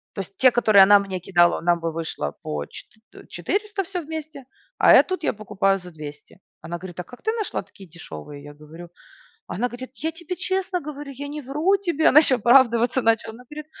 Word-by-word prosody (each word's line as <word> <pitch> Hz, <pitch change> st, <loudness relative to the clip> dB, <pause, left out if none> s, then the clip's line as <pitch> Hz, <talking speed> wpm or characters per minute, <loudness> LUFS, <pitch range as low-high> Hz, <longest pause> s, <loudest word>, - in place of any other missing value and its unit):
То 195 Hz, -, -3 dB
есть, 195 Hz, +1 st, -11 dB
те, 260 Hz, -1 st, +5 dB
которые 215 Hz, -5 st, +6 dB
она 205 Hz, +1 st, +7 dB
мне 195 Hz, -2 st, -5 dB
кидала, 175 Hz, -1 st, +2 dB
нам 175 Hz, 0 st, +2 dB
бы 165 Hz, -1 st, -3 dB
вышло 160 Hz, -, -4 dB
по 75 Hz, -1 st, -4 dB
четы 220 Hz, -, -14 dB
т -, -, -15 dB
400 415 Hz, -1 st, -3 dB
всё 365 Hz, -1 st, -5 dB
вместе, 310 Hz, -3 st, -8 dB, 0.3 s
а, -, -, +6 dB
э, -, -, +8 dB
тут 370 Hz, -3 st, -5 dB
я -, -, +1 dB
покупаю 195 Hz, -2 st, 0 dB
за 180 Hz, -1 st, -12 dB
200. 150 Hz, +1 st, -11 dB, 0.2 s
Она 170 Hz, +2 st, -6 dB
говорит: 175 Hz, 0 st, -10 dB
"А 180 Hz, -, -3 dB
как 245 Hz, -, -15 dB
ты 440 Hz, -, +1 dB
нашла 445 Hz, -3 st, -3 dB
такие 195 Hz, -2 st, -16 dB
дешевые?" 145 Hz, -, -10 dB
Я 145 Hz, 0 st, -11 dB
говорю. 160 Hz, +4 st, -13 dB, 0.6 s
Она 245 Hz, +7 st, -2 dB
говорит: 255 Hz, +2 st, -9 dB
"Я 320 Hz, +4 st, -3 dB
тебе 340 Hz, +2 st, -6 dB
честно 375 Hz, 0 st, -2 dB
говорю, 290 Hz, -2 st, -8 dB
я 285 Hz, +2 st, -7 dB
не 295 Hz, +1 st, -6 dB
вру 300 Hz, +9 st, +1 dB
тебе". 345 Hz, -5 st, +1 dB
Она 295 Hz, -, +7 dB
еще 275 Hz, -4 st, +2 dB
оправдываться 240 Hz, +1 st, +4 dB
начала. 225 Hz, -1 st, +1 dB
Она 250 Hz, -, -14 dB
говорит: 300 Hz, 0 st, -9 dB
240 Hz, 215 wpm, -23 LUFS, -, 0.6 s, э